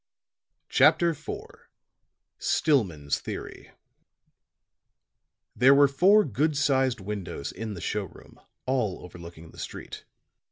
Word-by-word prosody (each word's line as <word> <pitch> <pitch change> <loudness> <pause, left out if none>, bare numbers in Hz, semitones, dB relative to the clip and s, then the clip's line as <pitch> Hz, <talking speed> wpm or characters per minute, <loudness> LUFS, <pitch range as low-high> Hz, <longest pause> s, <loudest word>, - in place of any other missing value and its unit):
CHAPTER 170 -1 +4
IV 150 - -11 1.1
STILLMAN'S 90 - +1
THEORY - - -8 1.9
There 130 +3 +6
were 140 0 +6
four 190 +10 +5
good 150 0 0
sized 135 -3 +1
windows 95 -7 -5
in 110 -2 -6
the 85 - -8
show 105 -1 -2
room, 85 - -17 0.3
all 125 -8 -1
overlooking 85 -2 -12
the - - -15
street. - - -8
120 Hz, 105 wpm, -26 LUFS, 90-140 Hz, 1.9 s, There